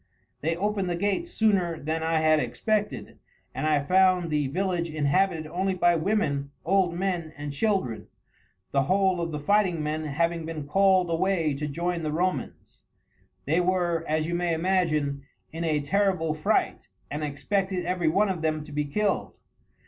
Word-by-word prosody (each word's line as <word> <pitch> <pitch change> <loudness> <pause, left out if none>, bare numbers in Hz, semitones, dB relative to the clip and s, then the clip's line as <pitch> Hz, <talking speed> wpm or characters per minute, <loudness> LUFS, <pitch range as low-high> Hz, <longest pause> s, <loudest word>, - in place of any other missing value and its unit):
They 165 +3 0
opened 195 0 -1
the 175 - 0
gates 205 - -1
sooner 195 - +1
than 160 +3 -2
I 160 0 +1
had 155 0 +4
expected, 215 +5 -2 0.3
and 155 - -2
I 150 -2 +2
found 185 0 +3
the 150 -2 +1
village 175 +2 -1
inhabited 155 +3 +1
only 185 +4 -1
by 175 -1 +3
women, 160 -6 0 0.2
old 185 -1 +2
men, 175 -3 -2
and 145 -1 -5
children, 185 - -1 0.6
the 140 - +3
whole 185 +4 +2
of 170 - -2
the 150 - -3
fighting 180 -1 +2
men 155 +1 -2
having 165 +3 0
been 160 -2 -5
called 190 +1 +3
away 165 -3 +1
to 150 +2 -3
join 170 +4 -2
the 155 -1 -2
Romans. 180 +4 -3 0.7
They 160 +5 +2
were, 175 -2 0
as 155 0 0
you 170 - -3
may 175 -1 0
imagine, 160 -5 0 0.3
in 165 +1 -4
a 155 -3 +1
terrible 185 0 +1
fright, 155 0 0 0.2
and 150 +2 -3
expected 185 +6 -1
every 180 -2 0
one 195 +7 +3
of 180 -4 -2
them 155 -1 -1
to 150 - -12
be 145 0 -1
killed. 205 +8 -1
170 Hz, 165 wpm, -26 LUFS, 155-190 Hz, 0.7 s, had